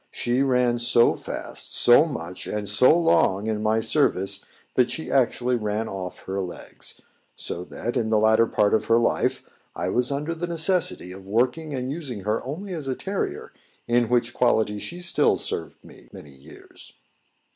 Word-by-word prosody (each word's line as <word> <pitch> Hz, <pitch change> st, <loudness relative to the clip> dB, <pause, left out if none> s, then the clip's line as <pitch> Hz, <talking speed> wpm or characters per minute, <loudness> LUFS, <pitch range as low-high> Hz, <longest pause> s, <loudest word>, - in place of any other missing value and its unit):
She 120 Hz, +2 st, -1 dB
ran 125 Hz, -3 st, +2 dB
so 120 Hz, 0 st, +4 dB
fast, -, -, -5 dB
so 120 Hz, +6 st, +6 dB
much, 90 Hz, -, -6 dB
and 105 Hz, -1 st, -3 dB
so 125 Hz, -, +5 dB
long 110 Hz, -, +2 dB
in 110 Hz, -1 st, -2 dB
my 110 Hz, +1 st, +1 dB
service, 110 Hz, -6 st, +1 dB, 0.3 s
that 125 Hz, -1 st, +2 dB
she 160 Hz, -, -5 dB
actually 125 Hz, -1 st, +1 dB
ran 105 Hz, -1 st, -2 dB
off 90 Hz, -2 st, -7 dB
her 95 Hz, +1 st, -3 dB
legs; 90 Hz, -2 st, -7 dB, 0.3 s
so 85 Hz, -, -5 dB
that, 120 Hz, +5 st, -5 dB
in 115 Hz, -3 st, 0 dB
the 110 Hz, -, +3 dB
latter 110 Hz, +1 st, +4 dB
part 105 Hz, -2 st, +1 dB
of 110 Hz, -, +2 dB
her 115 Hz, -, +4 dB
life, 120 Hz, -, 0 dB, 0.3 s
I -, -, -2 dB
was 125 Hz, +2 st, 0 dB
under 150 Hz, +4 st, -2 dB
the 170 Hz, +1 st, -4 dB
necessity 170 Hz, -, +2 dB
of 95 Hz, +1 st, -10 dB
working 130 Hz, +8 st, 0 dB
and 130 Hz, 0 st, -3 dB
using 140 Hz, -9 st, -5 dB
her 105 Hz, +3 st, -1 dB
only 180 Hz, +9 st, -6 dB
as 155 Hz, -5 st, -5 dB
a 130 Hz, -, -1 dB
terrier, 195 Hz, +6 st, -4 dB, 0.3 s
in 120 Hz, -1 st, +2 dB
which 120 Hz, -1 st, +1 dB
quality 110 Hz, -4 st, +1 dB
she 175 Hz, +10 st, -7 dB
still 175 Hz, -, +3 dB
served -, -, -5 dB
me -, -, -16 dB
many 70 Hz, -, -12 dB
years. 70 Hz, +3 st, -15 dB
120 Hz, 175 wpm, -24 LUFS, 105-140 Hz, 0.3 s, so